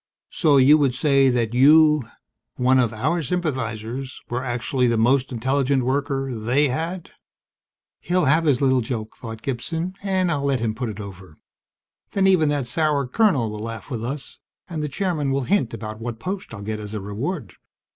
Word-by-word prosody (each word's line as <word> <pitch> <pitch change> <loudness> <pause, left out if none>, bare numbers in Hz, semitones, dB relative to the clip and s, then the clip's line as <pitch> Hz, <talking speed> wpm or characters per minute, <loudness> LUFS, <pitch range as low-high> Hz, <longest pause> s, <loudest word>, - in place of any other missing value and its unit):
"So 150 -4 +3
you 140 +4 +6
would 135 -4 +2
say 135 -1 +3
that 120 -2 0
you 150 0 +5 0.5
one 130 +1 +3
of 120 -4 +2
our 150 +11 -1
sympathizers 130 -6 -3
were 125 +1 -2
actually 125 +1 0
the 115 -1 +1
most 125 +4 +2
intelligent 130 +2 +1
worker 135 0 -1
they 125 +6 +1
had?" 165 +6 -4 0.9
He'll 180 0 0
have 155 +4 +3
his 140 -3 +2
little 130 -1 +3
joke, 110 -2 -5
thought 115 -1 -8
Gibson, 165 +8 -3
_and 190 -3 +1
I'll 140 -3 -1
let 135 -2 +1
him 110 -1 -1
put 120 +1 -4
it 105 -1 -7
over. 95 -5 -10 0.8
Then, 195 -1 +2
even 180 -6 +4
that 145 -3 0
sour 150 +1 0
colonel 135 - +2
will 105 - -6
laugh 115 +2 -7
with 115 -3 -3
us, 135 +1 -5 0.3
and 165 -5 -4
the 150 - -2
Chairman 160 -3 -1
will 135 0 0
hint 185 - +1
about 110 -1 -7
what 115 0 -4
post 185 +7 -5
I'll 100 -3 -8
get 110 +1 -4
as 105 0 -7
a - - -2
reward. 110 - -4
130 Hz, 180 wpm, -23 LUFS, 115-150 Hz, 0.9 s, you